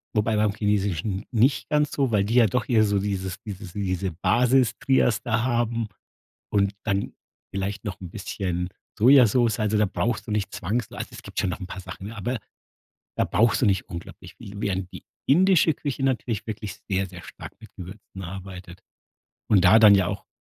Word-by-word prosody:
wobei 110 +1 +2
beim 105 -1 +2
Chinesischen 100 -2 -1
nicht 125 +4 +2
ganz 150 -1 +2
so, 135 -4 0
weil 105 -2 +3
die 110 +4 -1
ja 120 -3 +6
doch 115 +3 -1
eher 115 -3 +5
so 100 -1 +1
dieses 95 -2 -3
dieses 100 -3 -8
diese 95 -2 -2
Basis-Trias 125 +4 +2
da 115 -1 0
haben 120 -2 0 0.7
und 100 -1 +2
dann 100 -1 -1 0.4
vielleicht 100 +2 -3
noch 100 -6 -5
'n 90 -3 -8
bisschen 90 -2 -3 0.3
Sojasoße. 120 -1 +5
Also 105 0 +1
da 105 - +4
brauchst 115 +3 -2
du - - -7
nicht 105 -2 -1
zwangswei 105 +5 -3
also - - -4
es - - -10
gibt - - -9
schon 95 - 0
noch 90 - -5
'n 95 - -5
paar 95 - -7
Sachen, 95 +1 -9
ne? 115 - -9
Aber, 120 +5 -2 0.8
da - - +2
brauchst 110 +5 +2
du - - +4
nicht 95 -3 +1
unglaublich 85 0 -9
viel, 100 - -11
während 95 -2 -2
die - - -9 0.2
indische 175 +1 +5
Küche 140 -2 -4
natürlich 120 -5 -1
wirklich 105 -3 -5
sehr, 95 0 0
sehr 90 -1 -11
stark - - -10
mit 110 -2 -13
Gewürzen 95 +1 -10
arbeitet. 90 -1 -8 0.7
Und 95 -4 +4
da 105 +5 +8
dann 105 -2 +8
ja 95 -2 +3
auch, 100 0 -5
105 Hz, 190 wpm, -25 LUFS, 95-115 Hz, 0.8 s, da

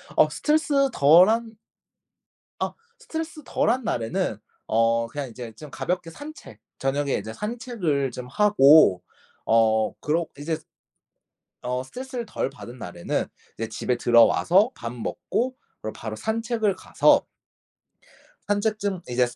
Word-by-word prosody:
어 - - +5
스트레스 300 -3 +2
덜 165 +6 +6
한 225 -1 -1 1.0
아. - - -2 0.3
스트레스 320 -8 -6
덜 - - +1
한 250 +2 +1
날에는 120 - -1 0.3
어 115 +1 +2
그냥 140 +3 -5
이제 120 0 -8
좀 145 +7 -11
가볍게 175 +2 -3
산책 290 - -11 0.2
저녁에 140 +1 0
이제 110 - -4
산책을 210 - -2
좀 125 +1 -7
하고 145 - +5 0.4
어 110 -1 +3
그러 165 +3 0
이제 160 +2 -2 1.1
어 125 +1 -2
스트레스를 250 - -6
덜 215 - -2
받은 130 -3 -11
날에는 90 -6 -3 0.3
이제 115 - -3
집에 120 +3 -1
들어와서 170 - +4
밥 115 0 -6
먹고 240 - -2 0.3
그리고 110 - -5
바로 110 -1 -6
산책을 220 - -1
가서 - - +3 1.2
산책 210 +1 0
중 195 -3 -2
이제 125 0 +2
스 120 0 -8
155 Hz, 255 characters per minute, -24 LUFS, -, 1.2 s, 덜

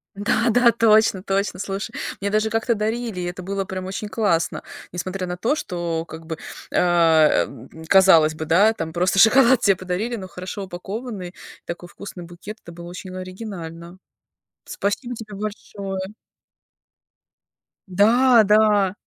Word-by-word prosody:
Да, 225 +3 +1
да, 240 +1 +5
точно, 220 -3 +4
точно. 195 -2 -1
Слушай, 200 +3 -4 0.3
мне 200 - -1
даже 215 +1 +1
как-то 225 +2 +1
дарили, 220 -1 -2
и 180 - -3
это 175 +1 -6
было 195 +1 -3
прям 185 0 -5
очень 195 +3 -5
классно, 185 -5 0 0.3
несмотря 185 +2 -4
на 180 0 -4
то, 230 +10 +1
что 170 - -3
как 160 +1 -10
бы, 160 -1 -5 0.4
а, 165 -3 +4
э, - - -11 0.4
казалось 170 -5 +6
бы, 155 0 -5
да, 200 +8 +4
там 160 -6 -5
просто 180 +3 +1
шоколад 240 +3 +6
те 195 -2 +4
подарили, 185 +6 -3
но 190 -4 -7
хорошо 185 +2 -7
упакованный, 190 +1 -7 0.3
такой 175 +1 -7
вкусный 185 -2 -9
букет. 185 +6 -10
Это 170 - -11
было 170 0 -10
очень 185 +1 -8
оригинально. 185 -3 -8 0.7
Спасибо 240 +5 -3
тебе 215 -2 -9
большое. 200 -2 -6 1.7
Да, 230 +5 +5
да! 210 -2 +4
195 Hz, 145 wpm, -22 LUFS, 175-215 Hz, 1.7 s, казалось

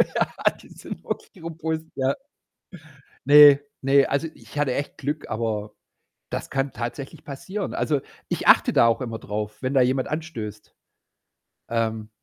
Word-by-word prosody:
Ja, - - +1
die - - -17
sind - - -9
wirklich 185 -6 -6
robust, 160 -1 -3
ja. 130 0 +1 1.1
Ne, 145 0 +9 0.2
ne, 135 +1 +5
also 140 +4 0
ich - - -13
hatte 140 -4 +1
echt 145 +3 -4
Glück, 145 +2 -3
aber 110 -2 -2 0.6
das - - -4
kann 135 0 -1
tatsächlich 120 +3 -6
passieren. 190 +9 -5
Also, 145 -3 0 0.3
ich - - -2
achte - - +6
da 115 - +6
auch 115 +2 +1
immer 115 -3 -4
drauf, 105 +1 -4
wenn 130 0 -1
da 135 - +5
jemand 130 +1 +1
anstößt. 120 -10 -6 1.0
Ähm 110 -2 -1
135 Hz, 145 wpm, -24 LUFS, 115-150 Hz, 1.1 s, Ne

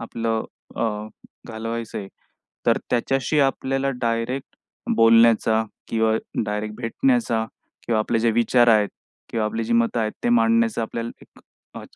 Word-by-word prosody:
आपलं 115 -1 -2 0.3
अ, - - -1 0.7
घालवायचं 115 0 -5
आहे. 100 -1 -7 0.6
तर - - +4
त्याच्याशी 135 +4 +1
आपल्याला 135 0 0
डायरेक्ट 115 +3 -2 0.4
बोलण्याचा 115 -1 +5 0.3
किंवा 110 -1 +1 0.3
डायरेक्ट 105 0 -3
भेटण्याचा 220 - +1 0.4
किंवा 115 -2 +1
आपले 110 +1 0
जे 115 0 +3
विचार 120 +1 +3
आहेत 105 -2 +4 0.4
किंवा 110 -2 0
आपली 115 +1 -2
जी 115 - -2
मतं 115 0 +2
आहेत 110 -1 -1
ते - - +2
मांडण्याचा 230 - +3
आपल्याला 115 +1 -4
एक - - -19 0.3
अ, - - -7
115 Hz, 135 wpm, -23 LUFS, 110-125 Hz, 0.7 s, बोलण्याचा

